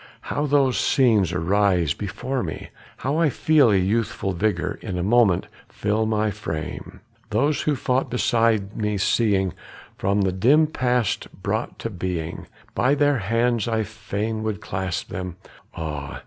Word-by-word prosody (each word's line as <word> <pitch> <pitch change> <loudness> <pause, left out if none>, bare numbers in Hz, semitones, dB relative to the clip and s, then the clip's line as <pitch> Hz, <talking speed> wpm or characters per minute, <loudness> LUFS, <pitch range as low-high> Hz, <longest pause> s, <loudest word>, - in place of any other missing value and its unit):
How 145 +1 0
those 140 -3 +3
scenes 110 - +3
arise 90 -2 +2
before 125 +8 -3
me! 80 -4 -6 0.3
How 140 +4 -1
I 165 -3 +4
feel 150 -1 +4
a 105 - +4
youthful 100 0 0
vigor 105 +4 -1
for - - -10
a 90 -1 -2
moment 105 -3 +3 0.2
fill 105 +2 0
my 110 -1 +1
frame! 90 -1 -6 0.3
Those 140 +8 +1
who 150 - +1
fought 130 +1 0
beside 115 -4 +1
me 105 -1 -1
seeing, 95 -3 +2 0.5
from 100 +1 +1
the 95 -1 +2
dim 130 +12 +4
past 125 -7 0 0.2
brought - - -2
to 115 - -5
being, 90 -3 -4 0.3
By 130 +4 +2
their 145 -2 +2
hands 115 +2 +1
I 110 -1 +1
fain 110 +1 -4
would 110 -2 -2
clasp 95 -2 -3
them 90 -2 -5 0.4
ah! 75 -3 -5
105 Hz, 150 wpm, -23 LUFS, 95-125 Hz, 0.5 s, I